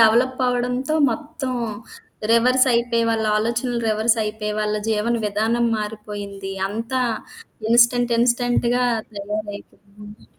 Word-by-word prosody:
Develop 240 +4 +4
అవ్వడంతో 250 +3 0 0.2
మొత్తం 290 -1 -4 0.8
reverse 255 +3 +4
అయిపోయి, 235 0 +1
వాళ్ళ 225 -1 0
ఆలోచనలు 235 +2 -1
రివర్స్ 220 +2 +2
అయిపోయి, 210 0 -3
వాళ్ళ 210 0 0
జీవన 220 +2 +1
విధానం 220 +3 +1
మారిపోయింది. 205 -2 -6 0.2
అంతా 230 +5 -2 0.7
ఇన్‌స్టంట్, 240 0 +4
ఇన్‌స్టంట్‌గా 245 0 +2 0.3
తయారైపోయింది. 205 0 -8
230 Hz, 100 wpm, -22 LUFS, 210-245 Hz, 0.8 s, Develop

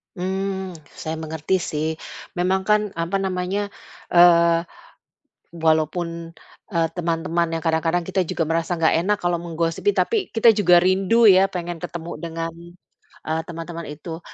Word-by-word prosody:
Hmm, 190 +1 -3 0.2
saya 160 0 -5
mengerti 160 +3 -2
sih. 155 -1 -2 0.5
Memang 190 +1 +1
kan, 210 +1 +3
apa 170 +4 -1
namanya, 190 +2 -2 0.4
eee, 170 -1 +5 0.9
walaupun, 165 +1 -1 0.4
eee, 165 -1 +1
teman-teman 170 0 -1
yang 165 - -1
kadang-kadang 165 +2 +1
kita 190 +1 -1
juga 160 -1 -2
merasa 165 +2 0
nggak 160 - +4
enak 205 +1 +1
kalau 175 -1 +1
menggosipi, 165 - -1
tapi 465 - +1 0.2
kita 225 -1 +5
juga 180 -4 +6
rindu 195 +5 +4
ya, 195 0 +5
pengen 175 -1 -4
ketemu 170 0 -6
dengan, 165 0 -5 0.7
eee, 160 +1 -1
teman-teman 165 0 -7
itu. 160 +3 -7
170 Hz, 135 wpm, -22 LUFS, 165-190 Hz, 0.9 s, juga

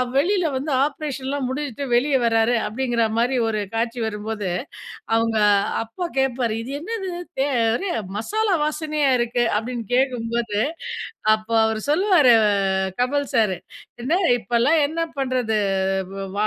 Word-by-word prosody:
வெளியில 360 +5 +2
வந்து 280 +3 -2
ஆப்ரேஷன்லாம் 280 -2 -3
முடிஞ்சுட்டு 280 -1 -4
வெளியே 270 +3 +3
வராரு 225 +1 +3
அப்படிங்கிற 240 0 0
மாதிரி 245 +3 +2
ஒரு 215 -1 -1
காட்சி 230 +2 -1
வரும்போது, 210 -1 -4 0.7
அவங்க 225 0 +2 0.5
அப்பா 290 +11 -5
கேப்பாரு. 255 -4 +1
"இது 255 +4 -7
என்னது 385 +2 -4 0.3
தே 270 - +3 0.3
ஒரு 390 - -3 0.3
மசாலா 425 - 0
வாசனையா 300 -1 0
இருக்கு?" 240 0 0
அப்படின்னு 235 +1 -4
கேட்கும்போது, 235 -4 0 0.7
அப்போ 215 +1 -3
அவரு 220 -1 -1
சொல்லுவாரு 315 - +5
அ - - +4 0.5
கமல் 285 +3 +1
சார், 215 -5 +3 0.5
"என்ன 320 +9 +1 0.2
இப்போலாம் 240 +7 +2
என்ன 320 +3 -4 0.2
பண்ணுறது 250 -4 0 0.8
வ - - -3
250 Hz, 125 wpm, -22 LUFS, 230-295 Hz, 0.8 s, சொல்லுவாரு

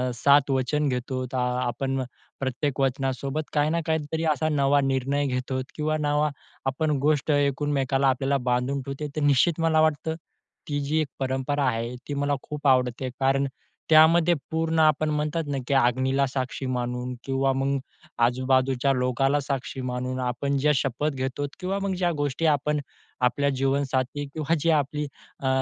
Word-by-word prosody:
7 140 +2 +4
वचन 140 +3 +1
घेतो. 130 +1 -2
आपण 125 +2 -1 0.4
प्रत्येक 135 +1 -2
वचनासोबत 135 +2 -1
काही 150 0 +2
ना 170 +1 +1
काही 160 0 +1
तरी 160 0 -1
असा 155 +1 0
नवा 140 -1 +3
निर्णय 135 +1 0
घेतो 130 0 -2
आहोत 130 0 -2
किंवा 155 0 0
नवा 150 0 +1 0.4
आपण 150 +3 0
गोष्ट 150 0 +2
एकमेकांना 140 -1 +1
आपल्याला 135 +2 +1
बांधून 125 +2 0
ठेवते. 140 +3 -5
तर 155 - -1
निश्चित 145 +4 +3
मला 160 -1 +3
वाटतं 155 +1 +1 0.5
ती 145 -1 -1
जी 150 +3 0
एक 150 - -2
परंपरा 135 +2 -1
आहे, 115 +1 -2
ती 145 - -3
मला 145 0 0
खूप 150 -1 -4
आवडते, 130 0 +2
कारण 135 +1 +2 0.4
त्यामध्ये 165 +2 +6 0.2
पूर्ण 160 0 0
आपण 155 0 +3
म्हणतात 150 +2 -1
ना, 140 -1 -2
की 140 - 0
अग्नीला 130 +2 +2
साक्षी 130 0 -3
मानून 125 0 -2
किंवा 135 0 +1
मग 135 +1 0 0.5
आजूबाजूच्या 130 +1 +2
लोकांना 135 +3 +1
साक्षी 135 -1 -4
मानून, 125 +1 -3
आपण 130 +3 -1
ज्या 150 +2 +3
शपथ 135 +3 -1
घेतो 135 +2 -2
किंवा 195 +2 -2
मग 195 -1 -1
ज्या 175 -1 +1
गोष्टी 145 +2 -1
आपण 150 +1 -1 0.5
आपल्या 140 +3 0
जीवनसाथी 135 +1 0
किंवा 160 +1 0
जी 165 - +1
आपली 150 0 0 0.3
अ, 135 - -3
140 Hz, 155 wpm, -25 LUFS, 130-150 Hz, 0.5 s, त्यामध्ये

